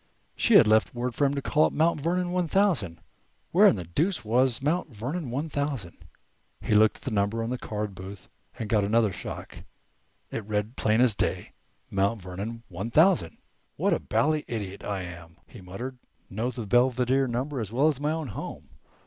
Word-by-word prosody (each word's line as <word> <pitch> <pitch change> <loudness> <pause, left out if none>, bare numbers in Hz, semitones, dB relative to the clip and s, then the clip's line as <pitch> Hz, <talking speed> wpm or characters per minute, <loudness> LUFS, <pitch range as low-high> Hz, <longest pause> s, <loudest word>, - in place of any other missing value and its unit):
She - - +3
had - - +8
left 110 +3 +3
word 120 0 -2
for 145 - +1
him 140 +1 +1
to 140 - -3
call 155 - +3
up - - -1
"Mount 160 -1 +2
Vernon 175 +3 0
one 180 -1 0
thousand." 160 - +1 0.5
Where - - +7
in - - +5
the 90 - -5
deuce 145 - -1
was 125 +2 +2
"Mount 155 +4 0
Vernon 130 - -4
one 140 +7 -2
thousand"? 140 - -3 0.6
He - - -1
looked 105 +1 +5
at - - -18
the 130 - -3
number 100 +1 0 0.2
card 105 -3 -4
in - - -15
the 95 - -10
booth 95 0 -10 0.3
and 110 - -4
got 105 -1 +2
another 110 +1 +2
shock. - - -7 0.7
It 115 - -4
read 105 0 -1
as - - -7
plain 110 +2 +3
as 125 -3 +5
day: - - -2 0.4
"Mount 100 +3 +1
Vernon 100 +6 -6
1000." 115 - +2 0.4
"What - - +1
a - - +1
bally 155 +1 +1
idiot 100 -4 -5
I 100 -2 -3
am!" 85 -1 -10
he 120 - -13
muttered. 120 +8 -7 0.3
"Know 110 +6 -1
the 120 -3 -5
Belvedere 125 +4 +2
number 130 +3 -2
as 105 -2 -5
well 135 +6 +3
as 150 -4 0
my 150 - 0
own 160 -4 -3
home. - - -7
115 Hz, 195 wpm, -27 LUFS, 100-145 Hz, 0.7 s, had